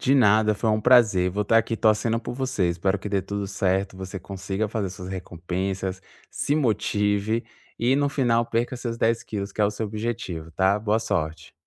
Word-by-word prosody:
De 135 - +3
nada, 110 -4 +4
foi 110 +1 0
um 110 - +1
prazer, 105 -7 +5
vou 100 +3 -1
estar 115 +3 +4
aqui 115 0 -1
torcendo 110 +1 +2
por 120 - -5
você. 130 -8 0
Espero 95 +3 0
que 105 - -6
dê 100 -1 +1
tudo 100 +1 -4
certo, 95 0 0
você 95 0 -6
consiga 95 +3 -3
fazer 100 -3 -2
suas 95 0 -8
recompensas, 95 +1 -4 0.3
se 145 - -1
motive, 105 -4 +1 0.3
e 125 +4 +3
no 145 0 +2
final 120 -4 +1
perca 120 +3 -1
seus 120 -1 -4
10kg 115 -3 -1
que 105 - -5
é - - +5
o 100 - +2
seu 110 +1 -4
objetivo, 105 -7 -4
tá. 95 +4 +2
Boa 110 +1 +1
sorte 80 -7 -3
105 Hz, 190 wpm, -25 LUFS, 95-115 Hz, 0.3 s, prazer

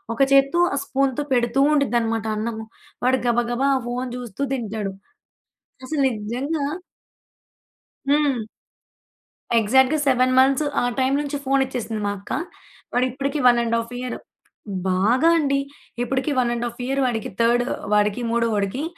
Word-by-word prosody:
ఒక 275 - -2
చేత్తో 275 +5 +4
ఆ - - -1
స్పూన్‌తో 275 +1 0
పెడుతూ 240 +1 +1
ఉండుద్దనమాట 230 -5 +1
అన్నము. 220 0 -4 0.4
వాడు 260 +1 +3
గబగబా 240 +3 +1
ఆ - - -2
ఫోన్ 250 +1 -3
జూస్తూ 245 +1 -5
తింటాడు. 215 -5 -3 0.9
అసలు 290 +1 -1 0.2
నిజంగా 275 +8 -2 1.4
హ్మ్. 285 -6 +2 1.1
ఎగ్జాక్ట్‌గా 265 +7 +3
7 255 -1 +3
మంత్స్, 270 +3 +4 0.2
ఆ - - 0 0.2
టైమ్ 260 +1 +2
నుంచి 285 0 -3
ఫోన్ 270 0 +2
ఇచ్చేసింది 230 -4 -4
మా 205 - 0
అక్క. 200 - -12 0.6
వాడిప్పడికి 265 +4 -1
1.5 230 -1 +2
ఇయరు. 250 0 -4 0.7
బాగా 225 - +3
అండి. 275 -3 +1 0.4
ఇప్పడికి 265 +4 -1
1.5 240 -1 -1
ఇయర్ 270 +1 0
వాడికి, 230 -4 -2
థర్డ్ 240 +1 +3 0.3
వాడికి 210 +3 +2
మూడో 235 0 +1
వాడికి 205 +7 -1
250 Hz, 125 wpm, -22 LUFS, 230-275 Hz, 1.4 s, చేత్తో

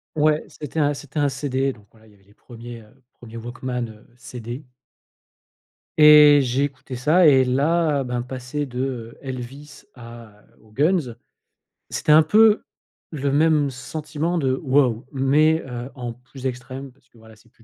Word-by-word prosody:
Ouais, 155 0 +2
c'était 150 +1 -8
un 145 -1 +2
c'était 145 +1 -8
un 145 - +2
CD 135 0 -2
donc, 105 -4 -19
voilà, 110 -1 -22
il - - -20
y - - -22
avait 100 - -26
les 100 - -25
1ers, 120 0 -11
heu, 105 +3 -23 0.2
1ers 115 -1 -10
walkman, 125 +1 -5
heu, 110 -1 -15
CD. 125 +2 -8 1.4
Et 150 -1 +8
j'ai 130 +1 0
écouté 135 -2 -6
ça 155 +8 +4
et 135 -3 +6
là, 145 +3 +1
ben, 125 -1 -3
passer 130 +3 -5
de, 125 0 -6 0.3
heu, - - -25
Elvis 135 +2 -8
à 115 -3 -13 0.2
aux 110 - -22
Guns, 145 - 0 0.7
c'était 150 - +2
un 155 +1 +7
peu 215 +6 +4 0.5
le 140 -2 -2
même 150 -1 +3
sentiment 155 +5 -4
de: 130 -4 +1
«Waouh!» 130 -4 +2
mais, 150 +4 +2
heu, 125 0 -6
en 120 -3 -6
plus 130 +2 -13
extrême 130 +1 -6
parce 130 -1 -33
que, 120 - -24
voilà, 110 0 -17
c'est 115 +2 -25
plus 115 - -26
130 Hz, 170 wpm, -22 LUFS, 120-150 Hz, 1.4 s, Et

